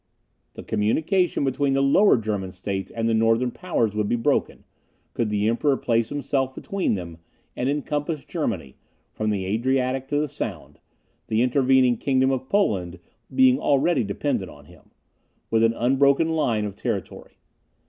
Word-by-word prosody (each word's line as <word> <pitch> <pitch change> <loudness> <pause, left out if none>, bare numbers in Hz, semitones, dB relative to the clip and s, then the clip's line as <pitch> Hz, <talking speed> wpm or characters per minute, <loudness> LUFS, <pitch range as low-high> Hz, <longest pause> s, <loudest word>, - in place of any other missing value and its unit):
The - - -8
communication 155 - 0
between 135 +1 0
the 135 0 +2
Lower 165 +5 +5
German 105 -4 -3
States 95 +1 -4
and 115 0 -2
the 115 - +1
Northern 115 +2 +2
powers 120 - -1
would 105 -1 -1
be - - +2
broken, 115 - -1 0.5
could 115 -2 -1
the 105 0 0
Emperor 135 +5 +1
place 115 -1 0
himself 135 -2 -2
between 195 - -1
them, 85 -3 -7 0.4
and 125 - -1
encompass 145 +1 -2
Germany, 95 - -4 0.4
from 110 0 -2
the 100 -3 -1
Adriatic 130 +5 0
to 145 +1 0
the 150 - 0
Sound, 90 - -6 0.5
(the 110 +2 +1
intervening 130 -1 +3
kingdom 130 +1 +1
of 130 0 -3
Poland 95 - 0 0.4
being 260 0 +5
already 140 +1 +2
dependent 100 -1 -2
on - - -15
him,) - - -19 0.6
with 115 0 +3
an 115 0 +3
unbroken 140 +6 +2
line 120 -10 0
of 100 -2 -6
territory. - - -5
125 Hz, 155 wpm, -24 LUFS, 110-140 Hz, 0.6 s, Lower